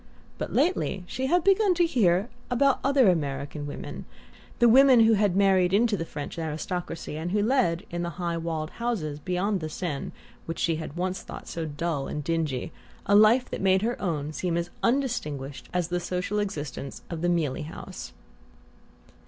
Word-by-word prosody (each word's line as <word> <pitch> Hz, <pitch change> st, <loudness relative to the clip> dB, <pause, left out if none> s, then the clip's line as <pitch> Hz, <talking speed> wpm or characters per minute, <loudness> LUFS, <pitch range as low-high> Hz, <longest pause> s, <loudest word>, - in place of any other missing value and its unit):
But -, -, -3 dB
lately 195 Hz, -, +1 dB
she 260 Hz, +8 st, -3 dB
had 350 Hz, +4 st, +3 dB
begun 390 Hz, 0 st, +4 dB
to 345 Hz, 0 st, +4 dB
hear 205 Hz, -, +2 dB, 0.2 s
about 270 Hz, +2 st, +3 dB
other 275 Hz, -3 st, +4 dB
American 145 Hz, -3 st, -1 dB
women, 145 Hz, -, -7 dB, 0.5 s
the 240 Hz, -, +5 dB
women 260 Hz, 0 st, +7 dB
who 225 Hz, 0 st, +6 dB
had 205 Hz, -3 st, +2 dB
married 190 Hz, -2 st, +4 dB
into 225 Hz, 0 st, +3 dB
the 165 Hz, -4 st, -3 dB
French 145 Hz, +2 st, -6 dB
aristocracy, 160 Hz, 0 st, -4 dB
and 165 Hz, +2 st, -3 dB
who 205 Hz, +2 st, +1 dB
led, 220 Hz, -9 st, +1 dB
in 175 Hz, 0 st, -2 dB
the 175 Hz, -, -2 dB
high 170 Hz, -2 st, -1 dB
walled 160 Hz, -2 st, -3 dB
houses 190 Hz, -12 st, -3 dB
beyond 185 Hz, +5 st, -1 dB
the 155 Hz, -2 st, -4 dB
Seine 155 Hz, -3 st, -4 dB, 0.4 s
which 165 Hz, -, -4 dB
she 165 Hz, -2 st, +1 dB
had 160 Hz, 0 st, -7 dB
once 185 Hz, +1 st, -2 dB
thought -, -, -9 dB
so 165 Hz, -1 st, -4 dB
dull 150 Hz, -1 st, -2 dB
and 150 Hz, -, -4 dB
dingy, 160 Hz, -2 st, -1 dB, 0.3 s
a 200 Hz, -, +2 dB
life 220 Hz, +5 st, +6 dB
that -, -, -4 dB
made 190 Hz, 0 st, +3 dB
her 240 Hz, +2 st, -1 dB
own 155 Hz, -5 st, -2 dB
seem 170 Hz, +1 st, -1 dB
as 170 Hz, 0 st, -3 dB
undistinguished 150 Hz, -, -1 dB
as 180 Hz, -2 st, -1 dB
the 175 Hz, 0 st, 0 dB
social 180 Hz, +4 st, -2 dB
existence 150 Hz, -9 st, -4 dB
of 165 Hz, -2 st, -4 dB
the 175 Hz, -, +1 dB
Mealey 155 Hz, -5 st, 0 dB
House. 160 Hz, -, -8 dB
180 Hz, 175 wpm, -27 LUFS, 160-220 Hz, 0.5 s, women